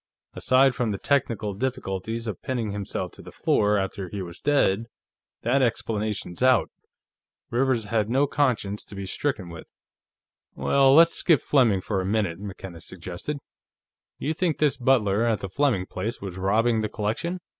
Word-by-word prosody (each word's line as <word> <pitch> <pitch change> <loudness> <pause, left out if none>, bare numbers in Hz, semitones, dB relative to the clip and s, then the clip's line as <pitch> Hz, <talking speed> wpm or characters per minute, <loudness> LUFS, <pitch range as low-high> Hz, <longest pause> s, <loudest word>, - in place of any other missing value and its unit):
Aside 130 +1 +4
from 120 -3 -1
the 100 - -2
technical 115 -6 0
difficulties 115 -1 -3
of 105 -6 -5
pinning 120 -5 -2
himself 100 -1 -4
to - - -13
the - - -11
floor 105 0 +2
after 95 -1 -3
he 100 0 -4
was 85 0 -10
dead, 115 -7 +2 0.6
that 130 +4 +2
explanation's 110 -6 -2
out. 130 -1 +4 0.8
Rivers 120 -2 +1
had 110 -1 0
no 135 +4 +3
conscience 125 -8 0
to 105 - -11
be 100 0 -5
stricken 105 -1 -2
with." 85 -1 -10 0.9
"Well, 135 -1 +4
let's 165 +1 +7
skip 165 -6 +3
Fleming, 115 -9 +3
for 95 0 -1
a - - -4
minute," 100 -5 0
McKenna 95 -4 -8
suggested. 90 - -6 0.8
"You 155 - -2
think 165 -1 0
this 150 -3 +2
butler, 115 -5 +2
at 115 -3 +1
the 95 - -4
Fleming 115 -5 +1
place, 105 +6 -4
was 95 -3 -6
robbing 110 +4 +2
the 110 - -2
collection. 110 - -2
110 Hz, 160 wpm, -25 LUFS, 100-130 Hz, 0.9 s, let's